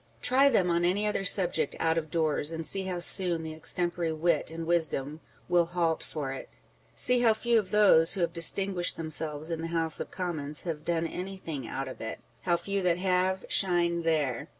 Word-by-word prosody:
Try 265 +3 +4
them 190 -8 +2
on 170 0 +1
any 190 +4 +1
other 210 -2 -1
subject 175 -6 +2
out 165 0 +1
of 160 -1 -3
doors, 155 -1 0
and 165 0 -5
see 190 +5 +1
how 185 -1 -3
soon 175 -1 +2
the 160 0 -6
extempore 170 0 -1
wit 165 -1 0
and 165 0 -6
wisdom 155 -3 0
" - - -32
will 175 -1 +3
halt 170 -2 -1
for 145 -4 -5
it." 135 - -8 0.5
See 250 0 +2
how 230 -2 +3
few 235 +1 +2
of 195 -3 -5
those 195 -6 +5
who 190 - -3
have 170 -1 0
distinguished 180 +1 +2
themselves 155 -1 -3
in 165 -1 -3
the 165 - -4
House 165 -1 -1
of - - -5
Commons 155 -5 -5
have 160 -4 -5
done 165 0 -1
anything 165 -7 -6
out 135 0 -4
of 130 - -9
it; 110 - -6 0.2
how 175 -1 +1
few 195 +3 -2
that 175 -2 +1
have, 185 0 0
shine 175 -2 +2
there 150 -7 -1
170 Hz, 200 wpm, -28 LUFS, 160-185 Hz, 0.5 s, those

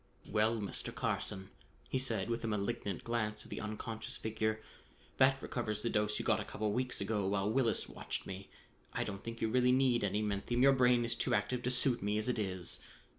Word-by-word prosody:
"Well, 110 +1 +2
Mr. 100 - -3
Carson," 95 0 -2 0.4
he 130 - 0
said 125 -5 0
with 115 0 -2
a - - -1
malignant 105 -2 -2
glance 110 -2 -1
at - - -15
the - - -4
unconscious 110 +1 -4
figure, 110 0 -1 0.6
"that 135 0 +5
recovers 110 -4 -2
the 115 - 0
dose 105 -1 +1
you - - -3
got 110 -2 +3
a - - -2
couple 105 0 -2
of - - 0
weeks 125 -1 0
ago 100 -1 0
while 100 +1 +1
Willis 120 -3 +2
watched - - -5
me. 95 0 -7 0.4
I - - 0
don't 100 -1 -5
think 115 0 -6
you - - +2
really 125 +2 +4
need 125 -3 +3
any 105 +1 +1
menthium; 105 +4 0
your 135 0 +8
brain 125 -2 +4
is 115 - 0
too 120 +1 +1
active 105 +4 0
to 125 - 0
suit 125 -1 +2
me 105 +1 0
as 110 - 0
it 125 -2 +1
is." 95 -4 -2
110 Hz, 215 wpm, -35 LUFS, 105-120 Hz, 0.6 s, your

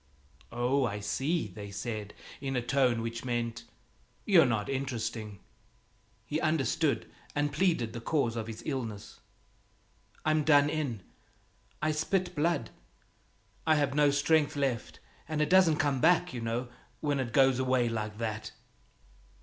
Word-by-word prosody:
"Oh, 125 +3 +1
I 105 -4 -1
see!" 135 +10 -1
they 100 +1 -9
said, 105 +1 -5 0.2
in 135 -1 -3
a 125 - +1
tone 125 -3 +2
which 115 0 -4
meant 120 -2 -2 0.6
"You're 175 -8 +6
not 110 -4 0
interesting." 115 -6 -3 0.9
He 150 +2 -2
understood, 155 -1 +1 0.3
and 145 0 0
pleaded 155 - +1
the 115 - -6
cause 120 -3 0
of 115 -1 -3
his 110 -1 -7
illness: 115 -8 -5 1.1
"I'm 155 0 +3
done 145 -1 +5
in, 135 -11 -2 0.8
I 155 - +3
spit 175 +4 0
blood. 160 -6 0 1.0
I've 145 -4 +3
no 145 0 +4
strength 145 +1 +2
left, 135 -5 -2 0.3
and 155 -1 -1
it 150 - +1
doesn't 180 -5 +6
come 145 -5 +1
back, 180 -2 +4
you 120 - -4
know, 115 +2 -2 0.3
when 145 -2 0
it 125 -3 -2
goes 135 +1 +4
away 130 -2 +2
like 110 -2 -3
that." 110 -1 -4
130 Hz, 140 wpm, -30 LUFS, 115-150 Hz, 1.1 s, You're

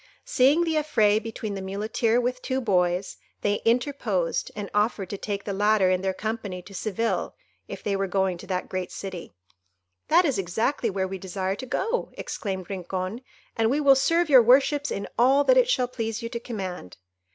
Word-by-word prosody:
Seeing 280 +7 +4
the 325 -2 0
affray 215 -9 +3
between 220 -1 -5
the 195 - -5
Muleteer 215 +4 0
with 250 +1 -2
two 260 0 -1
boys, 180 -5 0 0.2
they 205 0 0
interposed, 230 - 0
and 205 -1 -4
offered 210 -2 0
to 200 - -3
take 200 -1 -4
the 200 - -4
latter 205 -1 +3
in 185 0 +1
their 190 0 0
company 205 -3 -4
to 195 - -13
Seville, 215 +4 -2 0.3
if - - -8
they 200 - 0
were 195 0 -1
going 190 -1 0
to - - -11
that 185 -1 -2 0.2
city. 190 -3 -7 0.8
"That 345 +3 +5
is 270 -10 0
exactly 220 +7 0
where 190 -1 -1
we 190 0 -6
desire 190 +1 -3
to 260 - -8
go," 455 - -1
exclaimed 190 -4 -5
Rincon, 185 +3 -4 0.3
"and 225 0 +2
we 280 +4 +1
will 280 -2 +6
serve 330 +6 +2
your 265 -4 +8
worships 275 +4 +4
in 200 - -4
all 270 +4 +5
that - - +5
it - - +4
shall 250 - +2
please 230 -2 -4
you 230 - -3
to 235 - -4
command." 190 - -6
215 Hz, 185 wpm, -25 LUFS, 190-255 Hz, 0.8 s, your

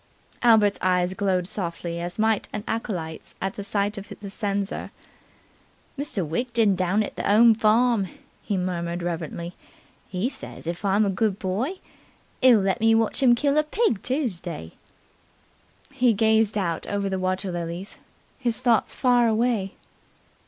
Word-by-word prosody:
Albert's 220 -4 +4
eyes 180 0 +2
glowed 190 -2 0
softly, 170 -3 -3
as 175 +1 -5
might 220 -1 +1
an 210 - -4
acolyte's 175 -8 -4
at 195 0 -3
the 200 - -5
sight 205 +1 -1
of 200 - -12
the 200 -1 -8
censer. 200 -1 -3 1.1
"Mr. 275 - -2
Widgeon 225 +4 +1
down 185 +4 +1
at - - -7
the - - -1
'ome 225 +2 +7
farm," 220 -1 +3 0.3
he 200 - -2
murmured 175 -1 -2
reverently, 170 0 -4 0.6
"he 190 +5 -1
says, 265 - -9
if 170 +3 -4
I'm 200 +2 +3
a 200 - +1
good 200 0 0
boy, 210 - -2 0.7
'e'll 245 -5 +7
let 195 +3 0
me 225 0 +4
watch 225 +2 +1
'im 245 -3 +6
kill 285 +4 +2
a - - +3
pig 305 - 0
Toosday." 185 - -3 1.2
He 250 -3 +3
gazed 220 0 +2
out 170 -5 -2
over 200 -1 -1
the 190 -1 -2
water 185 +1 -1
lilies, 175 +3 -5 0.4
his 235 -4 -1
thoughts 235 -3 +2
far 245 -2 +3
away. 220 -3 +1
205 Hz, 150 wpm, -25 LUFS, 185-230 Hz, 1.2 s, ome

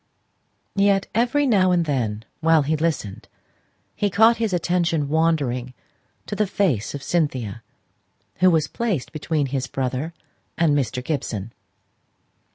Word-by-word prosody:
Yet, 200 0 +3
every 245 +6 +2
now 200 -8 +4
and 175 -2 +2
then 115 -7 -2
while 160 -1 +4
he 155 +3 0
listened, 150 -11 -2 0.7
he 205 - 0
caught 225 +4 +5
his 225 -2 -1
attention 170 -4 0
wandering 140 -6 0 0.5
to 205 - -4
the 210 0 +1
face 150 - 0
of 140 - -7
Cynthia, 130 - -1 0.8
who 185 - +5
was 160 -3 +2
placed 205 - -2
between 155 -1 -1
his 130 -1 -1
brother 135 +5 -3 0.4
and 165 -3 +3
Mr. 125 -2 -1
Gibson. 115 -8 -3
160 Hz, 130 wpm, -23 LUFS, 130-185 Hz, 0.8 s, caught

